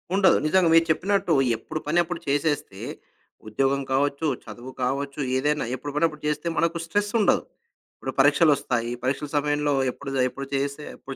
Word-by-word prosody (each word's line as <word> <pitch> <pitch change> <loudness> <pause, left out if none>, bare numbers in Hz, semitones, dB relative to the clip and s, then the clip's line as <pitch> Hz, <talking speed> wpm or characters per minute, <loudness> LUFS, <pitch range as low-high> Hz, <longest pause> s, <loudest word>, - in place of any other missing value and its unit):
ఉండదు. 195 -1 +5
నిజంగా 185 0 +4
మీరు 165 0 +6
చెప్పినట్టు 195 +1 +1 0.2
ఎప్పుడు 155 - -6
పనప్పుడు 170 +2 +1
చేసేస్తే 145 -8 -1 0.7
ఉద్యోగం 135 +5 +1
కావచ్చు, 140 +3 0 0.2
చదువు 120 +4 -9
కావచ్చు, 140 +3 -2 0.2
ఏదైనా 150 0 0
ఎప్పుడు 145 +2 -7
పని 150 +2 +3
అప్పుడు 150 -2 -11
చేస్తే, 150 +2 -2
మనకు 170 0 +1
స్ట్రెసుండదు. 205 +4 +1 0.5
ఇప్పుడు 130 - -5
పరీక్షలొస్తాయి. 145 -4 +3
ఈ - - -4
పరీక్షల 140 +3 -1
సమయంలో 145 0 +1 0.2
ఎప్పుడు, 135 +2 -8 0.2
ఎప్పుడు 140 +1 -7
చేసే 140 +2 -2
ఎప్పుడు 135 - -8
145 Hz, 145 wpm, -25 LUFS, 135-165 Hz, 0.7 s, మీరు